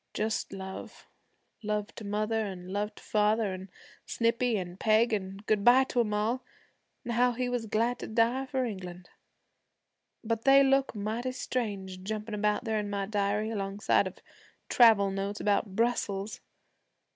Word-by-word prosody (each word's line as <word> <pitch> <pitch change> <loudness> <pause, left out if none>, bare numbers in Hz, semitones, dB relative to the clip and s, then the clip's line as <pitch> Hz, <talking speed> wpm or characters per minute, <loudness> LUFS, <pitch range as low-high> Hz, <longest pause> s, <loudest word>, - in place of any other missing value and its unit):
Just 220 +1 -1
love, 190 0 -8 0.6
love 210 -1 -2
to - - -9
mother, 215 +2 -1
and 185 -3 -7
love 210 +1 -2
to - - -14
father, 210 -1 +1
and 185 +1 -8 0.4
Snippy 230 0 +1
and 180 0 -6
Peg, 220 +1 +3
an' 195 -2 -3
good 210 -2 +1
bye 250 +3 +7
to 255 - -2
'em 225 -3 +1
all, 220 +5 0 0.6
an' 240 - -3
how 245 +1 +3
he 250 +1 -2
was 245 -2 -2
glad 230 +4 0
to - - -6
die 235 +4 +1
for 260 -1 -1
England. 180 -5 -7 1.1
But 225 0 -2
they 275 0 +7
look 270 -2 +2
mighty 225 +5 -3
strange 200 -8 -4
jumpin' 210 +1 -4
out 210 +2 +2
there 220 -2 0
in 205 -1 -3
my 200 -1 -2
diary 210 +1 0
alongside 200 -1 +1
of - - -9 0.5
travel 220 -5 +6
notes 195 +1 -3
about 200 -1 0
Brussels. 215 -3 -1
215 Hz, 155 wpm, -29 LUFS, 200-235 Hz, 1.1 s, bye